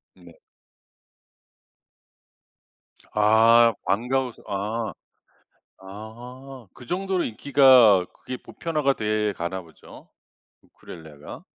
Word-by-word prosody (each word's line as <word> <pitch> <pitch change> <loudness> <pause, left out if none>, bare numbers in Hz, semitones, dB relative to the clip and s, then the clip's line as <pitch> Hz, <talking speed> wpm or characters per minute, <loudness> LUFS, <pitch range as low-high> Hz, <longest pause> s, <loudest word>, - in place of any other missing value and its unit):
네. 85 -3 -18 2.8
아 115 +2 +5
방과 125 +6 0
후 120 - -10
수 - - -20
아. 105 +3 -3 0.9
아. 120 +6 -11
그 125 - -14
정도로 185 +2 -2
인기가 120 -5 +5
그게 130 - -8
보편화가 150 -1 -2
돼 105 -1 -1
가나 90 +2 -5
보죠? 80 -2 -17 0.5
우쿨렐레가? 75 -3 -13
110 Hz, 160 characters per minute, -24 LUFS, 100-130 Hz, 2.8 s, 아